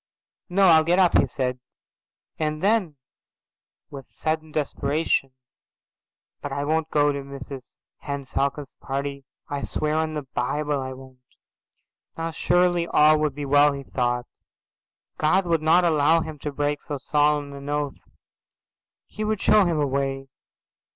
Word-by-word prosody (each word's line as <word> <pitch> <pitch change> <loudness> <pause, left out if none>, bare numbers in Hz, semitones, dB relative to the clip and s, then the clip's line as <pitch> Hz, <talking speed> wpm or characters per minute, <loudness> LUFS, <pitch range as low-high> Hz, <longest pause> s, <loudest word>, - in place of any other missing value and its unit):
"No, 195 +2 +3
I'll 160 -3 +7
get 175 +3 +2
up," 185 -2 +4
he - - +5
said, 125 -2 -3 0.8
and 155 0 -2
then 200 -7 +2 1.0
with 135 -3 -10
sudden 155 0 -3
desperation, 145 -2 -1 1.1
"But - - -5
I 140 - -2
won't 160 +1 0
go 145 -1 +3
to 140 0 -4
Mrs 135 -1 -10 0.2
Henne 140 -1 -5
Falcon's 140 +1 -2
party. 140 0 -4 0.2
I 145 -1 -4
swear 150 +2 -2
on 160 0 -1
the 150 - -3
Bible 140 +3 -2
I 130 0 -5
won't." 130 0 -14 1.0
Now 165 0 -3
surely 175 +1 +2
all 155 -1 +5
would 150 -3 -1
be 145 0 -4
well, 145 +1 +4
he 140 0 -6
thought. 120 -2 -1 0.9
God 185 +5 +3
would 165 -2 +1
not 170 +3 +4
allow 160 0 +3
him 155 -2 -7
to 150 - -4
break 145 +1 -1
so 145 - -5
solemn 145 +1 +1
an 140 0 -8
oath. 145 -1 -2 1.1
He 215 - -6
would 215 -1 -1
show 210 0 +5
him 165 -3 0
a 145 - +2
way. 135 0 -2
145 Hz, 150 wpm, -24 LUFS, 140-160 Hz, 1.1 s, I'll